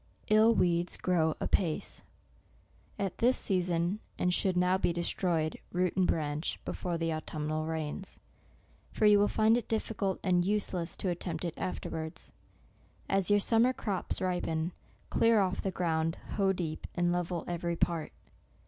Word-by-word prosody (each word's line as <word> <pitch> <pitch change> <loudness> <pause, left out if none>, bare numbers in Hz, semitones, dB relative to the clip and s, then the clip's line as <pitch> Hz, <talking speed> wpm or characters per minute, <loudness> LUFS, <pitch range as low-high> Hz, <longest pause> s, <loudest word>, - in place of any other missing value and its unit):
" - - -34
77/ 220 +2 +6
weeds 175 0 +1
grow 160 -4 +1
apace," 170 -6 -1 1.0
y 200 - 0
at 190 - -5
this 250 +2 +4
season, 180 0 0 0.2
and 180 0 +1
should 185 0 +1
now 180 +1 +3
be 190 - +1
destroyed, 170 -2 -1
root 180 0 0
and 185 -1 +3
branch, 150 0 -1
before 175 -2 -3
the 165 -1 -1
autumnal 155 0 -3
rains; 160 +4 -4 0.7
for 215 - +1
you 210 -1 +7
will 205 - +4
find 220 +2 +3
it 240 - -4
difficult 215 -3 -1
and 180 -2 +3
useless 185 -3 -1
to 185 - -1
at 175 - -4
tempt 170 -1 -4
it 170 - -2
afterwards. 160 -3 -5 0.8
As 195 -1 +1
your 205 0 +5
summer 230 +5 +3
crops 200 -7 -2
ripen, 175 -2 -1 0.4
clear 230 -1 +4
off 190 -1 0
the 195 - -1
ground, 165 -3 0 0.2
hoe 195 -2 +2
deep, 170 -4 -4
and 175 0 +2
level 175 -1 -2
every 170 0 -2
part. 165 -1 -1
180 Hz, 155 wpm, -31 LUFS, 165-195 Hz, 1.0 s, you